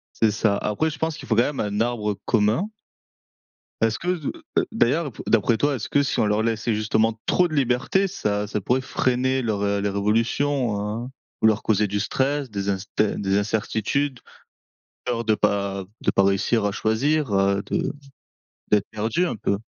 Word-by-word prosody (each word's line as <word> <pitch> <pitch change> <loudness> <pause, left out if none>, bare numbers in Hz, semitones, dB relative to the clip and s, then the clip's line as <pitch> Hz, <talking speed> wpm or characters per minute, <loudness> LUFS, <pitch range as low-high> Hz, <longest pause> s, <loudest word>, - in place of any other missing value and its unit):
C'est 110 -2 +3
ça. 105 -1 +1
Après, 105 +12 0
je 150 - -7
pense 160 -1 -1
qu'il - - -10
faut 110 - +2
quand 120 - +5
même - - -7
un 105 +1 -1
arbre 110 -4 0
commun. 115 - +2 1.1
Est-ce 115 -1 +2
que 180 - -3
d 155 - -3 0.3
heu, - - +4
d'ailleurs, 165 - +2
ap 125 - -8
d'après 115 +1 +3
toi, 145 +4 +1
est-ce 110 -5 -5
que 145 - +2
si - - -1
on - - +3
leur 105 +1 +1
laissait 115 0 0
justement 110 +1 +1
trop 180 - +3
de 155 - -8
liberté, 135 +9 +2
ça 105 - -1
ça 105 0 -2
pourrait 125 +7 +1
freiner 130 +1 0
leur, 110 -4 -1
heu, 100 0 +1
leur 100 0 -2
évolution, 115 +4 +1
hein? 110 +4 -4 0.3
Ou 110 - +6
leur 110 -1 +2
causer 105 -1 +2
du 100 +1 -1
stress, 135 +3 -1
des 100 -1 -3
inster 100 +2 -1
des 100 0 +1
incertitudes, 110 +6 -1 0.8
peur 120 -2 -2
de 110 -1 +3
pas 100 -2 0 0.2
de - - +1
pas 95 - +3
réussir 100 +3 +2
à 100 - +1
choisir, 135 +6 0
heu, 100 0 +2
de - - -1 0.8
d'être 105 -2 +3
perdu 110 +12 0
un 145 - -3
peu? 100 - 0
110 Hz, 190 wpm, -23 LUFS, 105-130 Hz, 1.1 s, Ou